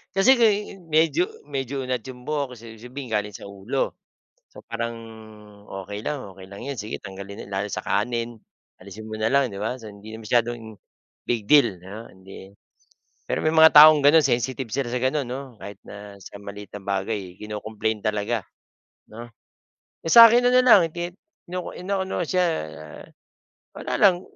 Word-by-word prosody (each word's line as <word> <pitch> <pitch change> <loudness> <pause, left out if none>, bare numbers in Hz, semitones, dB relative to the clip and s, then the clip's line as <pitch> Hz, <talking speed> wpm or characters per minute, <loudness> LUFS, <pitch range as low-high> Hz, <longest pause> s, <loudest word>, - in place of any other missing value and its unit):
Kasi 195 +7 +5
uh, 210 -3 +1
medyo 160 +2 +2 0.2
medyo 135 -1 -4
unat 125 -1 -2
'yong 125 -1 -10
buhok 140 -3 -3
kasi 115 -1 -12
sabihin 125 +1 -9
galing 105 -1 -2
sa - - -10
ulo. 100 +7 -3 0.5
So - - -15
parang 115 0 -4 0.9
okey 105 +1 -6
lang, 140 +4 -4
okey 95 0 -13
lang 100 +3 -10
'yon, 135 -4 -5
sige 105 +1 -5
tanggalin 100 +1 -9
lalo 100 +2 -2
sa - - -5
kanin. 115 +1 -2 0.4
Alisin 100 +3 -10
mo 110 0 -7
na 110 - +2
lang 135 -4 +2
'di 100 - -7
ba 115 +4 -2
hindi 105 +1 -10
na 110 - -12
masyadong, 115 -2 -1 0.5
big 115 -3 -1
deal 115 -5 +4
'no 100 +6 -10
hindi 95 0 -13 0.8
pero - - -2
may 155 - +2
mga 160 0 +8
taong 150 -1 +9
gano'n 155 +2 +7
sensitive 130 -1 -1
sila 125 +1 -2
sa 125 - -1
gano'n 135 +2 0
'no 130 0 -7
kahit 100 -1 -10
na 100 0 -11
sa 100 - -11
maliit 100 0 -10
na 100 - -8
bagay 95 -1 -3
kino-complain 105 0 -4
talaga, 105 0 -1 0.7
'no. 115 +2 -9 0.8
Eh, 165 - -3
sa'kin 235 +1 +9
na 245 - +4
na 255 0 +5
lang 210 -6 +8
gid 175 +1 -5 0.3
ino 180 +1 -5
inaano 190 -1 -3
siya 180 -1 +2 1.3
wala - - -3
lang, 185 -3 +4
120 Hz, 165 wpm, -24 LUFS, 105-145 Hz, 1.3 s, taong